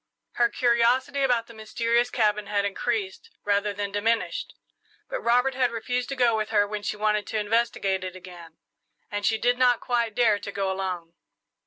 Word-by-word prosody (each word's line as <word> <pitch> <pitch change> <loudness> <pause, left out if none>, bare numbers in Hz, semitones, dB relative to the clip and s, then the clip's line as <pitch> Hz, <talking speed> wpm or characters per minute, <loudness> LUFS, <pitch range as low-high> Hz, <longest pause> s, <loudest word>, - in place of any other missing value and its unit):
Her 240 -1 +2
curiosity 245 +3 +2
about 245 -4 +2
the 230 - -14
mysterious 230 +2 0
cabin 210 -3 +1
had 200 -1 0
increased 205 - -3 0.2
rather 205 0 +1
than 200 0 -4
diminished; 230 - -1 0.5
but - - -4
Robert 250 +3 +2
had 255 -1 +1
refused 245 +2 -3
to 275 - -3
go 245 -3 +3
with 215 -1 -2
her 205 - +3
when 210 0 -4
she 210 - -3
wanted 210 0 0
to 220 - -2
investigate 210 -3 0
it 185 0 -6
again, 175 -3 -12 0.5
and 205 0 -1
she 220 - +2
did 245 +2 +1
not 245 -2 +4
quite 235 -3 -1
dare 220 -4 +3
to 200 - -7
go 195 -1 -1
alone. 180 -3 -4
220 Hz, 180 wpm, -26 LUFS, 205-240 Hz, 0.5 s, not